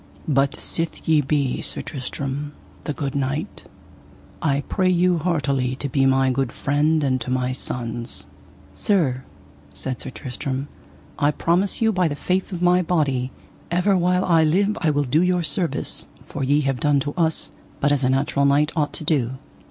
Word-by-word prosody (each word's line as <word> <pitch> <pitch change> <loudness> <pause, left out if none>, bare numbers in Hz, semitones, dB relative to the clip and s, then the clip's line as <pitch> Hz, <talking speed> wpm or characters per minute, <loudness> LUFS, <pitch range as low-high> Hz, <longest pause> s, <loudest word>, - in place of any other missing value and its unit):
But 140 -2 +2
sith 165 0 -3
ye 155 -2 +5
be 140 -2 0
Sir - - -1
Tristram, 140 +2 -5 0.3
the 150 - -2
good 140 -2 -3
knight, 140 +2 -2 0.8
I 140 -2 +1
pray 185 -2 +1
you 180 -1 +3
heartily 140 -6 0
to 140 - -3
be 135 +1 +3
my 135 0 +3
good 130 -1 0
friend 150 +2 +1
and 130 -2 +1
to 115 - -5
my 125 0 0
sons. 115 - -4 0.5
Sir, 145 -11 +1 0.5
said 130 - -4
Sir - - -6
Tristram, 130 +2 -5 0.5
I 145 -1 +4
promise 175 +8 +1
you 220 - +4
by 185 -4 +2
the 145 - -2
faith 185 +6 -1
of 180 -1 -3
my 180 +1 +5
body, 140 -7 0 0.4
ever 180 +3 +2
while 180 +1 +2
I 165 -2 +4
live 195 +7 +2
I 165 - +3
will 145 -1 +2
do 145 +5 +2
you 180 0 +2
service, 165 +3 -1 0.2
for 140 - -5
ye 145 +3 +3
have 135 -3 -1
done 145 -2 +3
to 145 +2 -3
us 160 -3 0 0.3
but 145 - +2
as 140 -2 +1
a 125 - +3
natural 140 +1 +1
knight 145 +2 +3
ought 150 -3 0
to - - -4
do. 130 -5 0
145 Hz, 175 wpm, -22 LUFS, 135-170 Hz, 0.8 s, ye